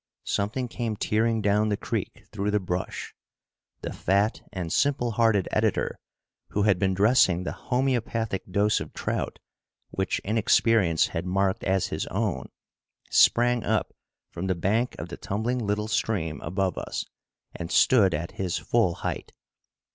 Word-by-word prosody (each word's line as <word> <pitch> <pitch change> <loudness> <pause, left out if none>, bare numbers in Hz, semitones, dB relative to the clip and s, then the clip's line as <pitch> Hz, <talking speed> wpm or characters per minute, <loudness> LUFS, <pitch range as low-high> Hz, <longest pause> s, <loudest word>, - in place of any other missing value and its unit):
Something 110 +6 -1
came 115 -2 -3
tearing 110 +1 +1
down 105 +1 +2
the 105 - 0
creek - - -4
through 105 -1 -2
the 105 0 +2
brush! 90 -1 -4 0.7
The - - -5
fat 100 +4 +1
and 85 -3 -4
simple 135 -4 +2
hearted 110 -3 +2
editor, - - 0 0.5
who 105 - -1
had 100 -4 +3
been 95 0 +1
dressing 95 -4 +4
the - - -3
homeopathic 120 -5 -1
dose 100 +3 +2
of - - -7
trout, - - -3 0.5
which 95 - -1
inexperience 110 -4 +3
had 85 +2 -4
marked 95 +3 0
as 95 -1 +1
his - - -2
own, 65 0 -2 0.6
sprang 120 -1 +4
up 110 -1 0 0.4
from 90 +2 -4
the 95 - +1
bank 110 +8 0
of 85 - -6
the 85 - -7
tumbling 115 +5 -2
little 105 -1 -1
stream 90 -8 -1
above 95 +1 -1
us - - -4 0.5
and 85 0 -6
stood 100 -10 +5
at 85 +3 -4
his 90 -3 -2
full 110 -8 +1
height. - - -4
105 Hz, 145 wpm, -26 LUFS, 95-115 Hz, 0.7 s, stood